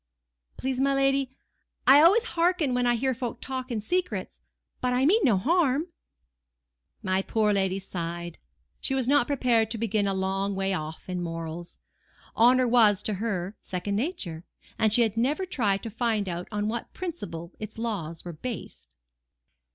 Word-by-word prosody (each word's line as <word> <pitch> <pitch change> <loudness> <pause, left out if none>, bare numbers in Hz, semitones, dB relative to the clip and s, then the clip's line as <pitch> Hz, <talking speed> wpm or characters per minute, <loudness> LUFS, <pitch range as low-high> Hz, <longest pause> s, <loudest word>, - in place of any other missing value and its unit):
"Please, 260 -1 -2
my 275 +1 +2
lady, 275 -1 +2 0.6
I 280 +2 +8
always 395 +9 +6
hearken 335 -5 +2
when 245 0 +1
I 240 - +3
hear 260 +3 0
folk 240 -1 -5
talking 255 -3 -4
secrets; 360 - -2 0.4
but 250 0 +1
I 255 +2 +2
mean 410 +9 +4
no 225 -7 +4
harm." 310 - +2 1.1
My 190 0 +1
poor 210 +1 +1
lady 190 -1 +1
sighed: 175 -2 -5 0.4
she 270 - 0
was 260 -2 0
not 285 -2 +4
prepared 240 -6 +2
to 230 - -2
begin 210 -2 0
a 195 - 0
long 195 +1 -1
way 195 0 0
off 155 -3 -5
in 180 -1 -3
morals. 165 0 -6 0.6
Honour 250 +2 +5
was, 220 -5 +4
to 215 - 0
her, 200 -3 -2
second 190 +2 -3
nature, 205 - -2 0.4
and 220 -1 +3
she 235 +3 +6
had 225 -1 -1
never 290 +11 +1
tried 210 - 0
to 225 - -5
find 225 -2 0
out 175 0 -4
on 210 0 -1
what 230 +2 -4
principle 190 - -6
its 215 0 -7
laws 190 -9 -4
were 175 - -6
based. 230 +9 -7
225 Hz, 165 wpm, -27 LUFS, 190-265 Hz, 1.1 s, I